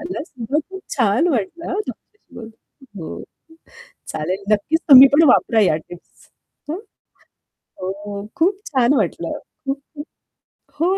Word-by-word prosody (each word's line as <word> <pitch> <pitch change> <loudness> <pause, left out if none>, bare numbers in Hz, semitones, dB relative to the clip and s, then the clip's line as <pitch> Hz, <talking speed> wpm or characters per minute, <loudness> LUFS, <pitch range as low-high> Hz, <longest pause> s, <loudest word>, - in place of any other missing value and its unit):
मला 330 0 -5
सुद्धा 255 -1 -4
खूप 380 0 -9
छान 235 - +2
वाटलं 275 - -2
हं 395 +4 -1
तुमच्याशी 420 -9 -12
बोलून. 225 0 -9 0.5
हो, 165 - -7 0.9
चालेल 185 +6 -3
नक्कीच 255 +11 +1
तुम्ही 270 -1 +11
पण 310 +3 +6
वापरा 230 -2 +3
या 185 -6 +3
टिप्स. 175 +2 -15 0.4
हं. 320 - -2 1.0
हो, 200 +2 -6
खूप 385 +4 +1
छान 260 -2 +2
वाटलं. - - -1 1.4
हो, 355 +6 +1
255 Hz, 120 wpm, -20 LUFS, 200-330 Hz, 1.4 s, तुम्ही